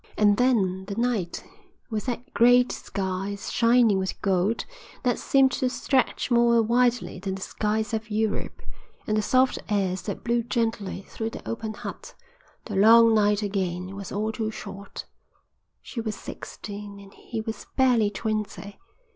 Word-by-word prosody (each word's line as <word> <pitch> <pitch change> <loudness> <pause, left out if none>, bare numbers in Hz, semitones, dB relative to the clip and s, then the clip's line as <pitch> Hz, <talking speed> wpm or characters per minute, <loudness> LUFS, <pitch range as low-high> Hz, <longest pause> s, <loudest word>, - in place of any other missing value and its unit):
And 205 -1 +4
then 195 -7 +2
the 200 0 -5
night, 230 -7 -1 0.5
with 215 +1 -3
that 245 0 -4
great, 245 +1 +5
sky 195 0 -3
shining 230 -2 +3
with 190 0 -3
gold, 195 +3 +1 0.4
that 245 -2 +1
seemed 270 -1 +4
to 255 0 0
stretch 260 0 0
more 235 -1 +5
widely 240 -2 +1
than 190 0 -3
the 190 - -8
skies 215 0 -1
of 220 0 -3
Europe, 215 0 -2 0.4
and 215 - 0
the 215 - +2
soft 255 +4 +2
airs 190 -3 0
that 200 - -5
blew 235 0 +1
gently 225 -5 -2
through 225 0 -4
the - - -10
open 220 -1 -4
hut, - - -8 0.5
the 210 - -5
long 225 +3 +7
night 210 -1 +3
again 190 -2 -2
was 200 -1 -7
all 215 +2 -1
too 220 0 -2
short. 200 -2 -8 0.8
She 235 - -5
was 220 -1 -3
sixteen 205 -1 -8
and 200 0 -14
he 230 - -6
was 220 0 -6
barely 245 -5 +4
twenty. 210 -1 -4
215 Hz, 155 wpm, -26 LUFS, 200-235 Hz, 0.8 s, long